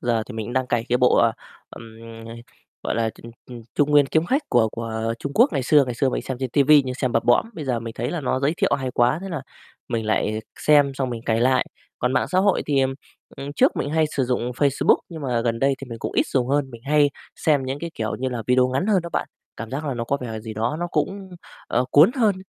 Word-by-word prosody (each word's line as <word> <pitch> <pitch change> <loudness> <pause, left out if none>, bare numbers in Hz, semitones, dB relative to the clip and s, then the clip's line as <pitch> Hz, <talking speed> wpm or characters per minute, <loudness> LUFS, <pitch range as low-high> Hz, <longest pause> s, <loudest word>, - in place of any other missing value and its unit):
giờ 115 -2 0
thì 125 - -9
mình 110 -2 -4
cũng 120 - -6
đang 130 -1 0
cày 120 -2 0
cái 125 +1 +2
bộ, 125 - +4
ờ, 115 -1 +4 0.4
ừm, 115 -1 -12 0.3
ờ, 115 - -8 0.5
gọi - - -2
là, 115 -1 0
ừm, 115 0 -11 0.2
ừm, 120 -2 -9
Trung 145 0 +2
Nguyên 145 -2 +5
Kiếm 160 +3 +1
Khách 275 +3 +1
của 115 -3 +3
của 115 0 -3
Trung 140 - -5
Quốc 245 +6 +4
ngày 130 - 0
xưa, 145 +2 +4
ngày 125 - -4
xưa 135 +3 +1
mình - - -2
xem 130 - -5
trên 130 - -2
ti 140 +2 +3
vi 150 0 +6
nhưng 130 - -4
xem 130 -2 -2
bập 115 - +1
bõm, 120 - +3
bây 155 - -6
giờ 125 -4 -1
mình 115 -1 -7
thấy 120 +2 -3
là 175 - -3
nó 130 -1 -1
giới 145 +4 +1
thiệu - - +2
hay 130 -1 -3
quá, 120 +5 +2
thế 195 - -6
là 160 -6 -4 0.5
mình 115 -3 -2
lại 110 0 0 0.2
xem 145 -2 +4
xong 130 -2 -2
mình 115 -1 -5
cày 115 -1 0
lại. 130 +1 +3 0.3
Còn 125 +1 0
mạng - - +1
xã 185 - +1
hội 200 +1 +2
thì, 140 -2 +2
ừm, 135 0 0 0.4
ừm, 140 +1 -6
trước - - +2
mình - - -2
cũng 150 - -4
hay 160 - +4
sử 135 - +2
dụng 125 -1 -1
Facebook, 140 +2 +2
nhưng 160 -3 -8
mà 125 -4 0
gần 115 -1 -1
đây 135 +2 +2
thì 135 - -8
mình 115 - -6
cũng - - -4
ít - - +1
dùng 130 -2 0
hơn, 140 -1 0
mình 115 -1 -12
hay 145 0 +3 0.3
xem 145 -4 +1
những 135 +2 -3
cái, 170 +2 -5
kiểu 110 -1 -3
như 130 - -1
là, 120 -3 -4
video 125 0 +3
ngắn 135 +9 -1
hơn 195 -5 +2
đó 170 - -6
bạn, - - -2 0.3
cảm 115 +1 -7
giác 145 +4 -4
là 140 - -2
nó 115 -1 -3
có 140 +4 0
vẻ 110 -3 -5
gì 110 -1 -8
đó 115 +7 -1
nó 175 - -1
cũng, 195 -1 -2 0.4
ờ, 125 +2 +1
cuốn 155 +9 +7
hơn. 215 -5 +3
130 Hz, 280 wpm, -23 LUFS, 115-145 Hz, 0.5 s, cuốn